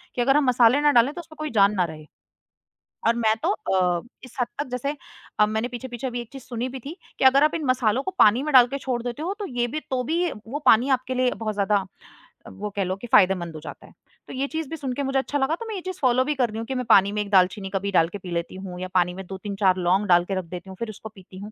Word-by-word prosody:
कि 245 - 0
अगर 270 +4 +4
हम 300 - +3
मसाले 250 +1 +4
ना 295 - +4
डालें 245 +2 +4
तो 345 - -6
उसमें 315 -1 -16
कोई 310 -1 -3
जान 200 -2 +4
ना 185 - +2
रहे 155 -2 -9 1.0
और 230 - +4
मैं 220 -2 +2
तो 335 - +1
अ, 180 - 0 0.2
इस 255 - -14
हद 245 - +2
तक 290 - -2
जैसे 275 +4 -3 0.4
अ, 210 - +6
मैंने 220 +3 -2
पीछे-पीछे 245 +1 -6
अभी 245 -1 -3
एक 235 - -9
चीज़ 270 -1 -9
सुनी 245 +1 -4
भी 265 +1 -7
थी 295 +8 -8 0.2
कि - - +1
अगर 270 +2 +6
आप 305 - +2
इन 325 -2 -3
मसालों 255 -1 +1
को 380 - -3
पानी 220 +5 +5
में 300 0 -3
डाल 250 -2 +8
के 275 +3 -4
छोड़ 250 -3 -3
देते 245 +4 -5
हो 370 +5 -2
तो 410 - -4
ये 245 -2 -1
भी 305 +5 -4
तो 255 -1 0
भी 310 - -2
ये 350 -4 0 0.2
वो 285 +5 -3
पानी 235 +5 +5
आपके 255 0 0
लिए 255 0 +2
बहुत 215 -1 -3
ज़्यादा 200 -1 +1 0.7
वो 210 +1 -6
कह 200 - 0
लो 185 +1 -2
कि 195 +5 -9
फ़ायदेमंद 180 -4 +3
हो - - -6
जाता - - -10
है। - - -19 0.3
तो - - -9
ये 270 +2 -2
चीज़ 315 -1 -4
भी 325 - -4
सुनके 275 -1 -3
मुझे 270 0 -1
अच्छा 285 +2 -2
लगा 280 +4 +1
तो 460 - -8
मैं 440 - -4
ये 375 - -5
चीज़ 370 0 -6
फ़ॉलो 255 -1 +3
भी 300 +1 -1
कर 250 -4 +1
रही 215 - -7
हूँ, 225 - -4
कि 265 - -3
मैं 250 -1 -2
पानी 200 -2 +6
में 210 0 -1
1 205 - -5
दालचीनी 190 +1 +3
कभी 200 +1 -1
डाल 165 -4 +4
के 205 - -6
पी 180 -2 -9
लेती 170 +2 -3
हूँ 185 -2 -8
या 185 - -3
पानी 180 -1 +2
में 190 +1 -8
2-3-4 195 -1 0
लौंग 185 +3 +1
डाल 175 -1 +4
के 195 - -3
रख 185 - -7
देती 180 +3 -9
हूँ 190 - -9
फिर 230 - -4
उसको 215 +1 -9
पीती 185 0 -14
हूँ। 205 +2 -8
235 Hz, 295 wpm, -24 LUFS, 195-270 Hz, 1.0 s, डाल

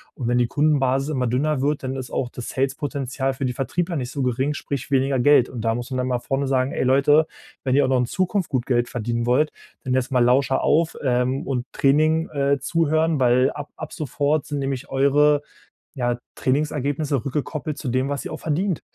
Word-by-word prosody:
Und 125 - -4
wenn 120 +1 +2
die 120 - +2
Kundenbasis 135 -1 +1
immer 130 -3 0
dünner 135 +4 0
wird, 145 +1 0
dann 130 0 -3
ist 130 -2 -6
auch 125 - -2
das 120 -1 -7
Sales-Potenzial 135 0 -2
für 135 - -3
die 125 - -1
Vertriebler 170 +7 -2
nicht 125 -5 -3
so 140 0 -3
gering, 130 +4 0
sprich 140 -2 -5
weniger 135 -1 +2
Geld. 130 -1 +5
Und 120 - -6
da 115 0 0
muss 120 +2 -6
man 130 - -1
dann 125 - -1
mal 125 -1 +1
vorne 135 +3 -2
sagen: 130 0 +1
„Hey - - -1
Leute, 145 +4 +4 0.4
wenn 130 -1 +1
ihr 145 0 +4
auch - - -1
noch 130 -1 +3
in 125 - 0
Zukunft 185 - -1
gut 125 -2 -1
Geld 120 -2 +1
verdienen 120 0 -2
wollt, 145 +5 +3 0.3
dann 130 - 0
erst 130 +1 -1
mal 125 -1 +4
Lauscher 130 +2 +3
auf, 165 +1 +2
ähm, 125 0 0
und 125 -2 -2
Training, 155 +4 +2
äh, 140 -1 +1
zuhören, 160 +1 +1
weil 125 +1 +4
ab 145 0 -7
ab 155 - -7
sofort 145 0 -1
sind 145 - -3
nämlich 135 -2 -3
eure, 145 +2 +3 0.5
ja, 120 -3 -1 0.2
Trainingsergebnisse 145 -1 0
rückgekoppelt 145 +1 -3
zu 145 - -6
dem, 130 +2 0
was 140 -1 -3
ihr - - -5
auch - - -6
verdient.“ 170 +3 -1
135 Hz, 210 wpm, -23 LUFS, 125-145 Hz, 0.5 s, Geld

